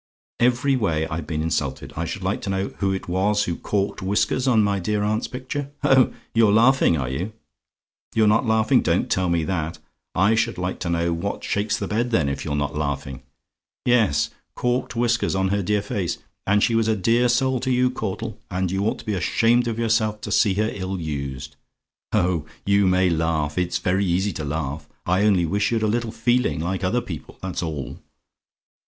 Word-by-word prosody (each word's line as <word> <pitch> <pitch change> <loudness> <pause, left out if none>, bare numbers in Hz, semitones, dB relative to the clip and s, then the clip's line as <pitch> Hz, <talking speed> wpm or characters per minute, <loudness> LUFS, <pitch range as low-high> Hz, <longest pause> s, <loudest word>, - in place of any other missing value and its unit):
"Every 125 +3 +3
way 80 -10 0
I've 75 -1 -5
been 80 -2 -2
insulted. 75 -5 -2
I - - -2
should - - -5
like - - -1
to - - -4
know 95 0 -1
who 100 -1 +1
it 95 - -4
was 100 +4 +1
who 85 -4 -2
corked 100 +2 -2
whiskers 105 +7 0
on 115 -4 +4
my 100 -1 +1
dear 105 +3 -1
aunt's 110 +2 0
picture? 135 +2 -5
Oh! 135 -3 +5 0.2
you're 115 -2 +5
laughing, 115 -4 +4
are 65 -3 -2
you? 85 - -3 0.8
"YOU'RE 110 -1 +4
NOT 110 +3 +3
LAUGHING? 110 -1 +3
"Don't - - 0
tell 90 -1 +1
me 85 -1 +1
that. 80 -2 -2 0.4
I 100 +4 +4
should 110 - 0
like 90 +1 -3
to 85 - -3
know 85 0 +1
what 100 +5 -3
shakes 105 +1 0
the - - -3
bed, 115 +3 0
then, 80 -12 +2
if 70 -1 -3
you're 75 -3 -2
not 75 -1 -1
laughing? 70 -3 -3 0.6
Yes, 105 -12 +3 0.2
corked 125 0 -1
whiskers 120 -3 +1
on 95 0 +1
her 100 +1 +1
dear 105 +2 0
face, 100 -4 -2 0.3
and 100 +1 +3
she 120 - +2
was 115 -1 +2
a 110 - +2
dear 115 +5 +2
soul 130 +1 +2
to 130 - -2
you, 125 0 +3
Caudle, 105 -2 -4
and 95 -1 -1
you 95 +1 0
ought - - -1
to - - -12
be 105 - -1
ashamed 115 +6 +2
of 115 -1 -2
yourself 110 -2 +1
to - - -5
see 100 -4 +3
her 110 +2 +1
ill 95 -1 -4
used. 70 -3 -5 0.6
Oh, 85 -3 +1 0.2
you 100 -1 +3
may 90 0 +3
laugh! 80 -2 0
It's 90 -1 0
very 95 +3 +1
easy 95 +3 +1
to 75 - -5
laugh! 75 0 -4 0.2
I 90 +4 +2
only 95 -5 +3
wish 100 +6 0
you'd 115 -2 +1
a - - +2
little 115 +1 -1
feeling, 120 -4 +1
like 95 +4 -2
other 110 +7 +1
people, 80 - -8
that's 95 -3 -3
all. 75 -6 -5
100 Hz, 200 wpm, -23 LUFS, 85-115 Hz, 0.8 s, Oh